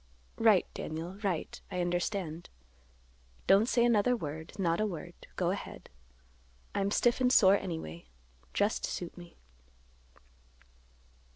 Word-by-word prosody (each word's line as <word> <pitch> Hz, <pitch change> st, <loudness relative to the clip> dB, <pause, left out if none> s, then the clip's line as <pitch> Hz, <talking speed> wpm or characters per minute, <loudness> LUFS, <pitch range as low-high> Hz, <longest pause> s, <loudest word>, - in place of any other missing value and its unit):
"Right, -, -, +5 dB
Daniel, 165 Hz, +3 st, -5 dB
right. 190 Hz, -6 st, -2 dB
I 180 Hz, -, -3 dB
understand. 175 Hz, -1 st, -2 dB, 1.0 s
Don't 200 Hz, +4 st, +5 dB
say 235 Hz, -1 st, +3 dB
another 240 Hz, +1 st, +3 dB
word; 160 Hz, -5 st, -6 dB
not 170 Hz, -1 st, +1 dB
a 215 Hz, -, +2 dB
word. 170 Hz, -6 st, -6 dB, 0.2 s
Go -, -, +1 dB
ahead. -, -, -7 dB, 0.8 s
I'm 200 Hz, 0 st, 0 dB
stiff 240 Hz, +4 st, +2 dB
and 250 Hz, -1 st, +4 dB
sore 195 Hz, -6 st, +7 dB
anyway; 160 Hz, -, -6 dB, 0.5 s
just 205 Hz, +2 st, 0 dB
suit 175 Hz, -, -4 dB
me." 175 Hz, -1 st, -13 dB
185 Hz, 115 wpm, -31 LUFS, 165-210 Hz, 1.0 s, sore